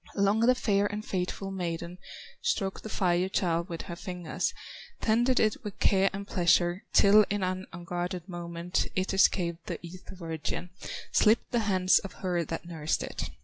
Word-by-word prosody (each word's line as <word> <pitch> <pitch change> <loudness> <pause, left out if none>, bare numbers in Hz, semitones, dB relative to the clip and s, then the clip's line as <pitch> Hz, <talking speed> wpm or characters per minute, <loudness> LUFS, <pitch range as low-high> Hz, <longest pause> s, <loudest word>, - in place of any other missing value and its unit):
Long 200 +1 +3
the 245 +3 +5
fair 205 -4 +2
and 210 +1 -5
faithful 190 +1 -3
maiden 175 -1 -4 0.4
Stroked 195 - -1
the 220 - -7
Fire 180 -2 +1
child 170 -1 0
with 165 -1 -5
her 170 - -6
fingers, 175 -1 -3 0.5
Tended 240 +3 +3
it 220 +5 +1
with 210 -3 -6
care 195 0 +3
and 200 +1 -6
pleasure, 175 0 +3
Till 210 +1 +7
in 205 -1 -1
an 185 0 -2
unguarded 175 +1 -4
moment 175 0 -2
It 185 +1 0
escaped 175 -3 +2
the - - -3
Ether 180 +2 -10
virgin, 165 0 -4 0.4
Slipped 220 +2 +3
the 240 - +2
hands 185 -1 +4
of 195 - -8
her 175 -2 +1
that 165 +2 -5
nursed 160 -3 -2
it. - - -5
185 Hz, 165 wpm, -29 LUFS, 175-200 Hz, 0.5 s, Till